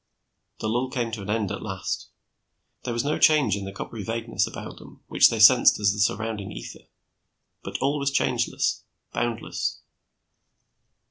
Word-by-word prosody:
The - - -1
lull 120 +4 0
came 120 -3 -2
to 110 -2 -5
an 100 - -8
end, 105 -2 0
at 100 - -5
last. 95 -3 -4 0.8
There 125 - -2
was 120 +1 -1
no 145 +2 -1
change 145 -10 +4
in 100 -1 -5
the 95 - -6
coppery 105 +2 -7
vagueness 115 +2 -1
about - - -8
them - - -15
which - - +6
they 115 - -2
sensed 120 +4 +7
as 100 -2 +3
the 105 - -6
surrounding 105 -1 -1
ether, - - -9 0.8
but - - -5
all 140 +2 +1
was 140 0 +1
changeless, 135 - 0 0.3
boundless. 120 -1 -2
115 Hz, 160 wpm, -25 LUFS, 105-125 Hz, 0.8 s, sensed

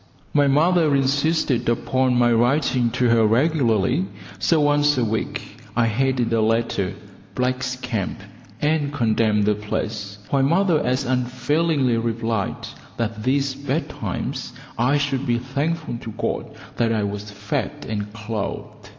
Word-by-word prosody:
My 145 -1 +4
mother 155 +1 +3
insisted 140 -2 +1
upon 130 +2 +1
my 120 -1 +4
writing 125 +1 +2
to 125 0 +2
her 115 -1 +4
regularly, 125 - +2 0.3
so 165 - +3
once 145 -1 +3
a 120 - +2
week 110 0 -4
I 120 0 +3
headed 120 +1 +1
a 115 - +3
letter 110 -3 0 0.4
"Black's 130 0 -1
Camp", 125 -6 -3 0.4
and 150 0 +1
condemned 110 -5 +2
the 105 +1 +3
place, 105 -1 -4
while 140 - +3
mother 170 +3 +3
as 130 +2 0
unfailingly 130 +2 +1
replied 115 -2 -2 0.3
that 115 -2 -2
these 135 +2 +1
bad 140 +3 -2
times - - -4 0.2
I 125 +5 +2
should 140 -1 -1
be 120 -1 +2
thankful 140 +1 -2
to 115 - -7
God - - -2 0.3
that 115 -1 +2
I 110 -2 +1
was 100 +1 -4
fed 105 0 -4
and 105 -1 -3
clothed. 110 -1 -5
125 Hz, 140 wpm, -22 LUFS, 115-140 Hz, 0.4 s, My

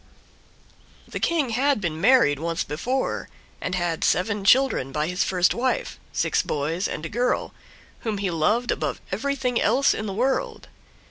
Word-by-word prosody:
The - - -5
King 320 -6 +1
had 270 +3 +2
been 165 -5 -3
married 225 - +5
once 165 +1 -1
before, 250 - -2 0.3
and 185 - -2
had 175 -2 -1
seven 205 +2 +1
children 240 - +3
by 150 +2 -1
his 180 +3 0
first 180 -1 +2
wife, 260 - -1
six - - +1
boys 160 +6 -2
and 155 - -5
a - - -2
girl, 245 +8 -1 0.5
whom 220 -4 -3
he 195 -2 -1
loved 210 +10 +1
above - - -2
everything 270 -4 -1
else 260 +6 +3
in 215 - -4
the 195 - -3
world. 265 - -1
205 Hz, 155 wpm, -24 LUFS, 170-255 Hz, 0.5 s, married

